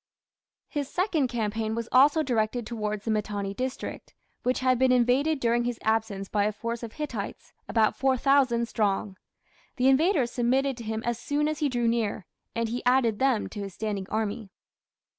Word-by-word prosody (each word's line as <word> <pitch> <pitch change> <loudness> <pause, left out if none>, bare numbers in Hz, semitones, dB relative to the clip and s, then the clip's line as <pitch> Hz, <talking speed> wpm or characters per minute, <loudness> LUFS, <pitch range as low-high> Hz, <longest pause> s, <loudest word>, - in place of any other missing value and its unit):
His 290 -3 -3
second 345 -7 +1
campaign 220 -1 -2
was 230 0 -3
also 285 +5 +5
directed 235 -2 0
towards 215 -2 -3
the 225 - 0
Mitanni 205 -2 -2
district, 255 +4 -5 0.3
which 255 +1 0
had 255 -1 +3
been 260 0 +4
invaded 255 +5 +3
during 240 -1 +2
his 240 -1 -2
absence 220 -3 0
by 205 0 +1
a 210 - +1
force 230 +2 -4
of 230 -2 -7
Hittites, 250 -10 -6 0.2
about 220 -2 +3
4000 260 -1 +2
strong. 205 -3 -1 0.6
The 250 +1 +2
invaders 275 -3 +3
submitted 260 +3 +1
to 235 - -7
him 220 +1 -3
as 240 -1 -1
soon 290 +4 0
as 310 -1 -2
he 295 - +1
drew 240 -2 0
near, 225 -5 0 0.3
and 230 0 0
he 240 +2 -4
added 245 -4 +3
them 260 -5 +2
to 210 - -8
his 195 -3 -6
standing 205 -3 -3
army. 215 0 -2
235 Hz, 175 wpm, -27 LUFS, 215-260 Hz, 0.6 s, also